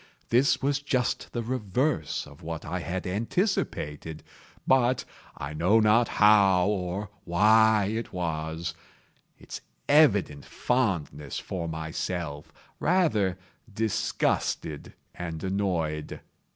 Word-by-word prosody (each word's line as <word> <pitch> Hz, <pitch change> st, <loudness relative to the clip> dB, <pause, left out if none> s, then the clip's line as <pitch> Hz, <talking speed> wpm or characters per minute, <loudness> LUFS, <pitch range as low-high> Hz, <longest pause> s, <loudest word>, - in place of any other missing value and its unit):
This 130 Hz, +3 st, +3 dB
was 140 Hz, +1 st, +1 dB
just 130 Hz, -4 st, -1 dB
the 120 Hz, -, -3 dB
reverse 115 Hz, -, -1 dB
of 75 Hz, -1 st, -15 dB
what 80 Hz, 0 st, -6 dB
I -, -, -3 dB
had 90 Hz, +4 st, -4 dB
anticipated; 90 Hz, -, -2 dB, 0.4 s
but—I 125 Hz, -, -1 dB
know 90 Hz, +8 st, +3 dB
not 110 Hz, +2 st, +4 dB
how 100 Hz, -4 st, +5 dB
or 95 Hz, 0 st, -3 dB
why 110 Hz, +3 st, +4 dB
it 110 Hz, +3 st, -3 dB
was—its 85 Hz, -1 st, -6 dB, 0.3 s
evident 100 Hz, -, +4 dB
fondness 90 Hz, -, -1 dB
for 85 Hz, -3 st, -4 dB
myself 80 Hz, -1 st, -4 dB, 0.3 s
rather 110 Hz, -, +2 dB, 0.4 s
disgusted 105 Hz, -7 st, -1 dB, 0.2 s
and 80 Hz, -3 st, -6 dB
annoyed. 90 Hz, -6 st, -2 dB
95 Hz, 95 wpm, -27 LUFS, 80-115 Hz, 0.4 s, how